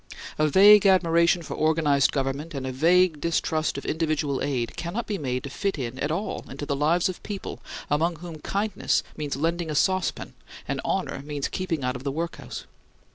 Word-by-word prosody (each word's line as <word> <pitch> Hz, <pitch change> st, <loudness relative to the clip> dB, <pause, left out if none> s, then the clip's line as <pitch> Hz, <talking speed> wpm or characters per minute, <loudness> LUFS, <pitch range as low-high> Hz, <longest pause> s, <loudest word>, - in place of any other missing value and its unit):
A 155 Hz, -, +4 dB
vague 200 Hz, +6 st, +7 dB
admiration 170 Hz, -2 st, +4 dB
for -, -, -6 dB
organized 155 Hz, -3 st, +2 dB
government 140 Hz, +3 st, -2 dB
and 135 Hz, -1 st, -4 dB
a 130 Hz, -, -2 dB
vague 165 Hz, +3 st, +3 dB
distrust 160 Hz, -2 st, 0 dB
of 140 Hz, -, -6 dB
individual 155 Hz, -3 st, -1 dB
aid 130 Hz, -4 st, -2 dB
cannot 185 Hz, +8 st, -3 dB
be 205 Hz, -3 st, -3 dB
made 130 Hz, -2 st, -2 dB
to 140 Hz, -, -6 dB
fit 195 Hz, +6 st, -2 dB
in 130 Hz, -1 st, -4 dB
at 145 Hz, -, -1 dB
all 175 Hz, +7 st, -3 dB
into 140 Hz, +2 st, -6 dB
the 140 Hz, -, -1 dB
lives 160 Hz, +5 st, +2 dB
of 185 Hz, -, -5 dB
people 200 Hz, -2 st, -6 dB, 0.3 s
among 165 Hz, +4 st, +1 dB
whom 165 Hz, -1 st, -9 dB
kindness 200 Hz, +5 st, 0 dB
means 145 Hz, -3 st, -3 dB
lending 165 Hz, +3 st, -1 dB
a 155 Hz, -, -2 dB
saucepan 185 Hz, +4 st, 0 dB, 0.3 s
and -, -, -2 dB
honor -, -, -2 dB
means 145 Hz, -1 st, -3 dB
keeping 170 Hz, -6 st, -2 dB
out 125 Hz, +1 st, -1 dB
of 125 Hz, -, -7 dB
the 140 Hz, -, -1 dB
workhouse. 165 Hz, +3 st, -5 dB
155 Hz, 185 wpm, -25 LUFS, 140-175 Hz, 0.3 s, vague